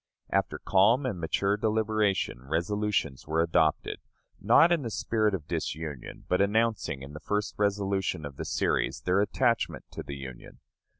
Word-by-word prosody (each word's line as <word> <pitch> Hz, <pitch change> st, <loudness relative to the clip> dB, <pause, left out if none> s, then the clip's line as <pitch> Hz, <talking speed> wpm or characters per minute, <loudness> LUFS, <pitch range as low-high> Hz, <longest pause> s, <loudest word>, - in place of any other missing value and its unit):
After -, -, 0 dB
calm 110 Hz, +8 st, +3 dB
and 105 Hz, -9 st, -2 dB
mature 100 Hz, +5 st, +1 dB
deliberation, 110 Hz, -, 0 dB
resolutions 85 Hz, 0 st, -1 dB
were 80 Hz, +1 st, 0 dB
adopted, 80 Hz, -2 st, +1 dB, 0.4 s
not 170 Hz, -, +5 dB
in 170 Hz, -3 st, +3 dB
the 120 Hz, -, -4 dB
spirit 110 Hz, -2 st, 0 dB
of 75 Hz, -6 st, -8 dB
disunion, 75 Hz, -4 st, -5 dB
but 90 Hz, -, +2 dB
announcing, 105 Hz, -8 st, +1 dB
in 70 Hz, +2 st, -9 dB
the 75 Hz, -, -7 dB
first 105 Hz, +4 st, -2 dB
resolution 100 Hz, -5 st, 0 dB
of 70 Hz, -2 st, -8 dB
the -, -, -4 dB
series, -, -, 0 dB
their 90 Hz, +2 st, +2 dB
attachment 115 Hz, +3 st, 0 dB
to -, -, -6 dB
the 70 Hz, -, -7 dB
Union. 65 Hz, -3 st, -9 dB
100 Hz, 155 wpm, -28 LUFS, 80-110 Hz, 0.4 s, not